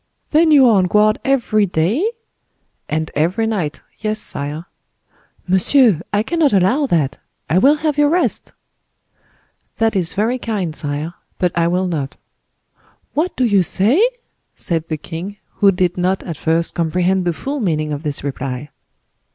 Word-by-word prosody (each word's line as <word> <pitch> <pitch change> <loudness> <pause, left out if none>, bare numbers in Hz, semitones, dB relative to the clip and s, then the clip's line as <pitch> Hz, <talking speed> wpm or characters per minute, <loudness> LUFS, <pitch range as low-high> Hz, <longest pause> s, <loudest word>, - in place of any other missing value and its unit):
"Then 315 +1 +4
you 285 -4 +7
are 220 -3 +5
on 185 - +3
guard 210 +3 +3
every 235 -6 +2
day?" 185 - 0 0.9
"And 155 +1 -2
every 175 +9 +1
night. 190 -9 -2 0.2
Yes, 215 0 -2
sire." 150 -2 -5 0.8
"Monsieur, 190 - +4
I 205 +1 +1
cannot 315 0 +1
allow 205 +10 +3
that—I 155 - -1
will 280 +9 +5
have 300 -1 -1
you 295 - +5
rest." 345 +4 0 1.2
"That 225 -2 +1
is 180 -3 -1
very 230 +5 0
kind, 195 -9 -3
sire; 150 +3 -4 0.2
but 180 -2 0
I 170 -1 +2
will 180 +2 +1
not." 150 -7 -3 1.0
"What 340 +5 -1
do 255 - +2
you 205 -4 +4
say?" 215 - +2 0.5
said 165 -2 -3
the 155 - -3
king, 175 +7 -7 0.2
who 200 -1 +5
did 180 -1 0
not 185 +2 0
at 170 - -5
first 165 +2 0
comprehend 180 +3 +1
the 175 - +2
full 275 - -4
meaning 155 - -1
of 145 - -4
this 150 -4 -3
reply. 135 0 -5
185 Hz, 150 wpm, -18 LUFS, 160-225 Hz, 1.2 s, you